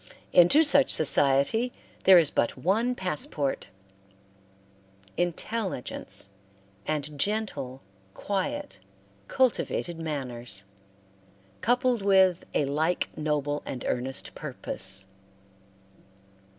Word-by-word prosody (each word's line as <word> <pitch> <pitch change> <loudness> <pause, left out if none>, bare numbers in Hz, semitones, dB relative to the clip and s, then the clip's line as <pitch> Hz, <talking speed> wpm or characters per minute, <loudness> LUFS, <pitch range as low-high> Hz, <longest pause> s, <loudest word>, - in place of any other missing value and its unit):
Into 180 - +7
such 280 -3 +4
society 145 - +3 0.3
there 190 -1 +9
is 165 -4 +4
but 120 - 0
one 220 - +1
passport 150 - -2 1.5
intelligence, 175 - -2 0.6
and 150 -1 -3
gentle, 145 -10 -2 0.3
quiet, 285 - -3 0.5
cultivated 215 -9 0
manners, 125 -9 -3 1.0
coupled 245 -1 +2
with 190 -3 +4
a 145 - +2
like 155 +5 -1
noble 150 -1 -1
and 125 - -6
earnest 130 +2 -2
purpose. 95 0 -4
165 Hz, 80 wpm, -27 LUFS, 140-215 Hz, 1.5 s, there